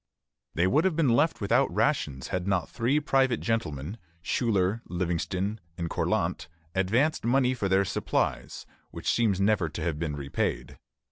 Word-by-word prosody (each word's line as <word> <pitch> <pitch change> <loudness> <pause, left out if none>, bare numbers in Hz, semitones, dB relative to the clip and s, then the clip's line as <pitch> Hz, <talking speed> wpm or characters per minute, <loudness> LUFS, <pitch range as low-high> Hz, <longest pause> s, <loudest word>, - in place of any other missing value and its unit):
They 85 - +3
would 145 - +3
have 190 -4 +2
been 155 -5 +2
left 145 +5 +2
without 100 - +2
rations 65 -3 0
had 90 0 -2
not 95 -4 +1
three 125 +5 +1
private 135 -4 +2
gentlemen 100 -5 -2 0.2
Schuyler, 105 -2 +1
Livingston, 90 +4 -2 0.2
and 85 -1 -3
Cortlandt 80 - -1 0.3
advanced 115 +12 +1
money 125 +1 +3
for 100 -6 -2
their 95 +1 +3
supplies, - - -2 0.2
which - - -2
seems 110 -5 +2
never 100 -4 +2
to 80 +1 -5
have 80 -2 -2
been 80 -3 -2
repaid. 70 -1 -3
100 Hz, 150 wpm, -28 LUFS, 85-120 Hz, 0.3 s, They